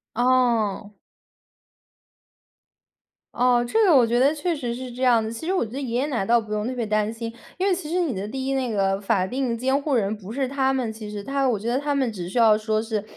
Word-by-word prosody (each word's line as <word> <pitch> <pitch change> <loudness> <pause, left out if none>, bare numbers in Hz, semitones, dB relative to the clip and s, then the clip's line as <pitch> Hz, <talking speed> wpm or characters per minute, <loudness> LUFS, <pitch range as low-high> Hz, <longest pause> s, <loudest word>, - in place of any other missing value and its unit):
嗯。 235 -4 +1 2.4
哦， 245 -1 +3
这 445 - +2
个 360 -7 +5
我 245 - +5
觉 235 +1 +1
得 270 +3 +4
确 330 +3 -1
实 245 -5 -4
是 255 0 -7
这 245 +2 -9
样 240 -3 +4
的， 220 - -3
其 230 +8 -7
实 - - +1
我 370 - +1
觉 215 - -11
得 270 +3 -5
爷 240 -4 -3
爷 260 - +1
奶 255 -9 -1
倒 235 +4 +3
不 215 -1 -6
用 210 +1 -1
特 255 - -3
别 240 -2 -2
担 215 0 0
心。 230 0 -6 0.2
因 375 +2 0
为 390 - +3
其 350 -4 -5
实 350 +3 0
你 330 -7 0
的 195 0 -4
第 260 +4 -4
1 270 - -1
那 260 -3 -1
个 195 -1 0
法 195 -2 +1
定 250 +2 -2
监 265 +3 +1
护 280 -1 0
人 210 -2 0
不 200 0 -10
是 265 +2 -1
他 265 0 +1
们 250 -4 -2
其 215 -1 -8
实。 205 -1 -6
他 275 +3 0
我 230 - +1
觉 210 +3 -6
得 250 +2 +1
他 290 0 -1
们 265 -4 0
只 180 -4 -6
需 220 - -5
要 225 -2 +6
说 215 0 -1
是， 220 -2 -3
240 Hz, 270 characters per minute, -24 LUFS, 215-270 Hz, 2.4 s, 要